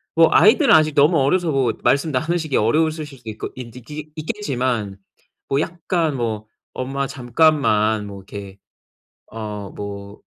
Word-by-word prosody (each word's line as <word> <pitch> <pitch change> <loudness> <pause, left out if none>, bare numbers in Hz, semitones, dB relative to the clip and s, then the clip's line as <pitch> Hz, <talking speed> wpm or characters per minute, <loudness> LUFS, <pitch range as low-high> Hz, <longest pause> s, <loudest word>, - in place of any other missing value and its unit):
뭐 165 0 +6
아이들은 230 - +6
아직 155 -1 +3
너무 150 +4 +5
어려서 165 +6 +2
뭐 130 -4 +2
말씀 140 +3 +2
나누시기 155 +2 0
어려우실 155 +7 +1
수도 130 -6 -11
있고 110 - -5
있 120 -3 -9
있기 150 +5 -9
있겠지만 130 - -2 0.5
뭐 135 +1 +1
약간 165 -3 -1
뭐 110 -3 -3 0.3
"엄마 135 +2 -2
잠깐만 120 -6 +2
뭐 100 -1 -8
이렇게 100 0 -9 0.7
어 105 -2 -6
뭐 100 0 -8
135 Hz, 285 characters per minute, -21 LUFS, 110-155 Hz, 0.7 s, 뭐